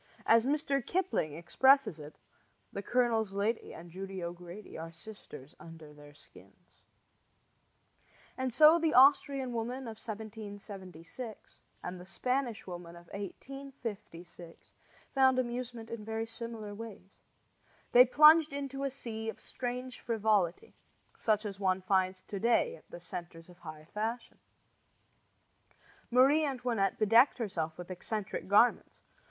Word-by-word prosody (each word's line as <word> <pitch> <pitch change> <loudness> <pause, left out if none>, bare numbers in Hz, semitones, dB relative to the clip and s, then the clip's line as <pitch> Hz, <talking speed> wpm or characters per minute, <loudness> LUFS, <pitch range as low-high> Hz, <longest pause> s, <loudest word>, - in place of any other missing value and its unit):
As 230 +1 +5
Mr. 280 -2 0
Kipling 350 - -1
expresses 215 - +3
it 150 +1 -10 0.6
The 200 - -4
colonel's 225 -2 +1
lady 210 +4 -1
and 170 +1 -11
Judy 190 0 -6
O'Grady 175 +3 -8
Are 165 +1 -6
sisters 165 -6 -12
under 160 -2 -12
their 145 0 -15
skins; 145 - -19 1.5
and 260 -1 -2
so 310 +6 +7
the 320 -2 +1
Austrian 270 -1 +5
woman 240 +3 -3
of 220 -1 -8
1776 205 -1 -8 0.2
and 180 0 -5
the - - -11
Spanish 250 +1 -2
woman 175 -2 -8
of 170 0 -15
1856 205 -7 -8 0.4
found 265 -1 +4
amusement 240 -2 -3
in 230 -2 -5
very 220 +1 -3
similar 225 -2 -7
ways. 205 -3 -10 0.7
They 245 - +9
plunged 305 +4 +7
into 275 -1 -4
a 275 - 0
sea 225 -4 -5
of - - -7
strange 250 0 -5
frivolity, 210 -6 0 0.5
such 215 -1 +1
as 200 -2 -5
one 190 -1 +1
finds 185 0 +1
to 200 - -6
day 240 - +2
at - - -20
the - - -9
centers 170 -1 -8
of 175 0 -16
high 155 -2 -10
fashion. 225 +3 -4 1.7
Marie 270 +6 +5
Antoinette 245 -8 0
bedecked 225 +5 +5
herself 165 -9 -3
with 180 +1 -8
eccentric 200 +3 -4
garments. 210 +5 +3
220 Hz, 125 wpm, -32 LUFS, 185-250 Hz, 1.7 s, They